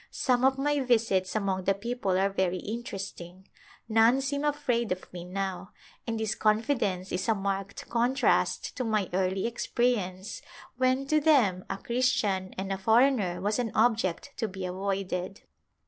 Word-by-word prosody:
Some 250 -1 +1
of 265 0 +4
my 290 +1 +1
visits 225 -8 +1
among 190 -3 -1
the 195 - +3
people 205 -3 -1
are 195 +1 +2
very 185 -2 0
interesting; 195 -4 -7 0.4
none 225 +3 +4
seem 280 +1 -2
afraid 270 -7 0
of 180 0 -4
me 175 -1 -6
now, 190 0 -4 0.3
and 225 -1 -2
this 220 -1 0
confidence 215 -4 0
is 185 +4 -2
a 225 - +4
marked 195 0 -3
contrast 245 +3 +1
to 255 - -1
my 215 -4 0
early 190 +1 0
experience 225 -5 -1 0.4
when, 255 +1 +2
to 305 +2 +3
them, 240 - +3
a 195 - -2
Christian 205 -5 0
and 195 +1 -2
a 190 - -4
foreigner 220 -4 +3
was 210 +4 0
an 235 -3 -1
object 220 0 +1
to 225 - -1
be 190 -1 -6
avoided. 190 0 -3
210 Hz, 155 wpm, -28 LUFS, 190-245 Hz, 0.4 s, of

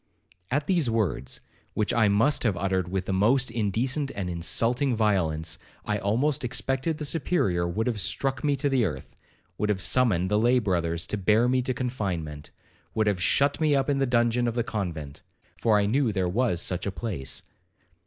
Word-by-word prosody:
'At 145 +3 0
these 170 -8 +2
words, 105 - -2 0.3
which 105 - 0
I 115 -2 +4
must 115 +9 +2
have 105 -7 0
uttered 95 -1 0
with 95 0 -2
the 95 - -2
most 120 +6 +2
indecent 120 +6 -1
and 95 -3 -3
insulting 115 - +1
violence, 85 -7 0 0.3
I 105 -1 -1
almost 130 +9 0
expected 135 +5 -1
the 150 - -4
Superior 130 - 0
would 105 +6 -1
have 115 -4 -1
struck 135 +5 -1
me 145 -1 +2
to 140 +1 -1
the 135 -3 +2
earth,—would 105 +3 -6
have 100 -3 +1
summoned 95 -4 +2
the 105 - +3
lay 120 +3 +4
brothers 85 -6 -1
to 105 - -3
bear 110 +5 +3
me 130 +1 +2
to 130 0 -2
confinement,—would 100 - -4
have 100 -4 0
shut 140 - +2
me 150 -2 +3
up 135 +1 +1
in 140 - 0
the 135 - +1
dungeon 120 0 +2
of 115 - -2
the 120 - +1
convent, 85 -11 -5 0.4
for 110 -2 +4
I 100 - +2
knew 120 +3 +1
there 95 -3 0
was 100 -2 0
such 90 +2 -2
a - - -1
place. 85 - -5
110 Hz, 185 wpm, -26 LUFS, 95-130 Hz, 0.4 s, I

